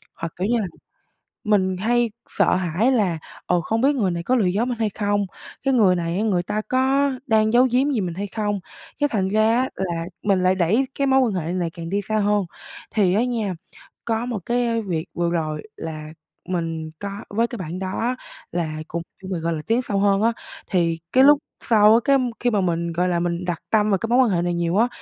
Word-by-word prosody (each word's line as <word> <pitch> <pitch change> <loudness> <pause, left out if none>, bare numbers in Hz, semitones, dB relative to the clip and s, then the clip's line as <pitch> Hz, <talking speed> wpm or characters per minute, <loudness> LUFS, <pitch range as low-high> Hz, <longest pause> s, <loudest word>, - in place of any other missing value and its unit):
hoặc, 165 -1 -5
kiểu 185 +3 -1
như 235 +1 +2
là, 195 - -2 0.8
mình 190 -3 +2
hay 235 +3 +1 0.2
sợ - - +2
hãi 185 +7 +1
là, 195 -9 +1 0.3
ờ, 180 -1 +2
không 225 +7 -1
biết 285 +2 +3
người 200 -7 +1
này 170 0 -3
có 255 - +2
lừa 220 -6 +2
dối 200 +6 +1
mình 240 -2 -3
hay 220 -2 +1
không? 205 0 0 0.4
Cái 270 -1 +2
người 200 -7 +5
này 170 +1 -2
á, 210 - 0
người 185 -5 +1
ta 215 +4 -2
có 270 +2 +2 0.2
đang 220 0 +3
giấu 250 +2 +6
giếm 270 +4 +2
gì 230 - 0
mình 175 -3 -3
hay 200 +2 -3
không? 205 -1 -2 0.4
Cái 290 0 +2
thành 190 -4 0
ra 215 +2 +3
á, 260 - -1
là 170 -3 -2 0.2
mình 195 -3 +2
lại 185 +1 +3
đẩy 190 +9 +2
cái 275 - 0
mối 265 0 +4
quan 235 -5 +1
hệ 175 -1 -2
này 175 -2 -1
càng 165 0 -7
đi 200 +2 0
xa 215 +2 -1
hơn. 205 -1 +2 0.5
Thì 195 -5 +2
á 225 - +3
nha, 225 -6 -1 0.5
có 225 0 -1
một 240 -4 -3
cái 235 -1 +1
việc 170 -5 -3
vừa 170 0 0
rồi 155 -3 -2
là 155 -1 -6 0.4
mình 165 -3 -3
có 200 - -4 0.2
với 230 +3 +1
cái 240 - -7
bạn 180 -1 -5
đó 210 +6 -2 0.4
là 155 -3 -3
cùng 170 - -3 0.2
với 190 - -7
mình, 170 -3 -2
gọi 170 0 0
là, 155 - -4
tiến 235 +3 +2
sâu 205 -5 -1
hơn 200 0 +3
á, 230 - +3 0.4
thì 170 -3 +1
cái 260 +1 +6
lúc 290 +1 +7 0.2
sau 215 -2 +6
á, 230 - +6
cái 275 0 +5 0.2
khi 245 - +1
mà 205 -3 +2
mình, 170 -2 -1
gọi 180 +2 +1
là, 175 - +1
mình 175 +1 -2
đặt 175 -2 -2
tâm 215 -1 +3
về 195 - +4
cái 225 - -1
mối 245 - +4
quan 255 -3 +5
hệ 175 -4 +1
này 175 0 0
nhiều 170 +2 0
á 235 - +4
200 Hz, 235 wpm, -22 LUFS, 175-230 Hz, 0.8 s, lúc